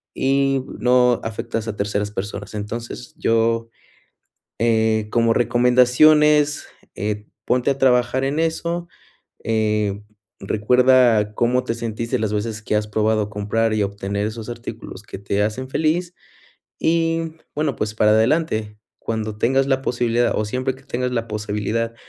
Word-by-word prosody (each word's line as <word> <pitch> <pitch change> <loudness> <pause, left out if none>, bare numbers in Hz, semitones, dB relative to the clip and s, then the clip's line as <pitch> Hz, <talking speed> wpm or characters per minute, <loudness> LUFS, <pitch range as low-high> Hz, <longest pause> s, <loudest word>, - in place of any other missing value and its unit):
y 135 0 +1 0.2
no 125 -1 +4
afectas 115 0 -4
a 110 - -3
terceras 100 0 -2
personas. 100 0 -6
Entonces 115 +6 -6
yo, 115 -4 +1 0.9
eh, 110 -1 +2
como 115 -1 +3
recomendaciones, 125 +5 +4 0.3
eh, 105 +1 -3 0.2
ponte 125 +2 +1
a 135 - -1
trabajar 130 0 +2
en 145 +4 0
eso, 170 +1 -2 0.6
eh, 105 -2 0 0.4
recuerda 115 0 +3
cómo 125 +3 +1
te 115 - -2
sentiste 115 -1 -3
las 110 -2 -1
veces 110 +1 -3
que 105 - -2
has 105 0 +1
probado 110 0 0
comprar 110 +2 0
y 110 - 0
obtener 100 +1 -3
esos 110 +1 -7
artículos 115 -4 -8
que - - -8
te 100 +1 -1
hacen 110 +5 -3
feliz 160 +4 0 0.7
y 165 0 0 0.2
bueno, 150 -4 0
pues, 105 -1 -3
para 105 -1 +4
adelante, 110 -2 +1 0.2
cuando 110 -1 -4
tengas 135 +4 +2
la 135 -1 +1
posibilidad 120 -1 +1
o 110 - 0
siempre 130 +4 -2
que 135 - -18
tengas 125 -1 -3
la 115 -2 -2
posibilidad 105 +2 -2
115 Hz, 140 wpm, -21 LUFS, 105-130 Hz, 0.9 s, no